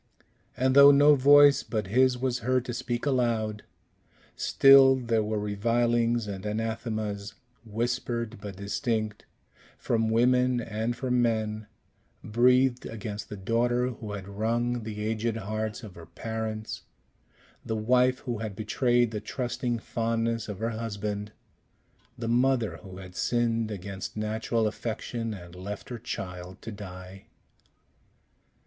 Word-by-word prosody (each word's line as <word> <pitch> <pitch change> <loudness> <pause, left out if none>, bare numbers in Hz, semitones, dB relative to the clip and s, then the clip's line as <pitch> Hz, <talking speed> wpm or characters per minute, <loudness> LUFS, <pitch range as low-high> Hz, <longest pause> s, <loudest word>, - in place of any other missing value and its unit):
And 130 +1 +2
though 140 0 +10
no 145 +1 +7
voice 145 0 +7
but 110 -3 -3
his 125 +5 +3
was 125 -1 -1
heard 130 +1 0
to 120 - -4
speak 120 +2 -3
aloud, 115 -6 0 0.7
still 135 -1 +6
there 115 -3 0
were 105 0 -2
revilings 115 +3 +1
and 100 -2 -6
anathemas, 110 -1 -3 0.3
whispered 115 0 -3
but 100 -2 -7
distinct, 110 +2 -2 0.5
from 115 -1 0
women 125 +2 +3
and 110 +1 -2
from 125 0 0
men, 110 -2 -1 0.6
breathed 125 +3 +3
against 105 -1 -6
the 105 - -6
daughter 120 +5 +1
who 110 -4 -7
had 100 -2 -6
wrung 115 +4 -1
the 105 -1 -6
aged 110 +1 -1
hearts 110 +2 -4
of 105 -4 -9
her 85 -1 -12
parents, 110 +4 -5 0.8
the 110 - -3
wife 125 +3 +2
who 120 -3 -4
had 110 -3 -5
betrayed 120 +2 +1
the 105 -2 -4
trusting 120 +1 -2
fondness 115 0 -2
of 105 - -5
her 115 +3 -2
husband, 105 -2 -4 0.9
the 115 - -4
mother 120 -1 +2
who 95 -3 -11
had 90 -1 -11
sinned 115 -2 0
against 100 0 -6
natural 110 +1 -1
affection, 115 +1 -3
and 85 -2 -11
left 95 +3 -7
her 120 -2 -5
child 90 -5 -6
to 115 - -6
die. 95 -2 -10
115 Hz, 130 wpm, -28 LUFS, 105-120 Hz, 0.9 s, though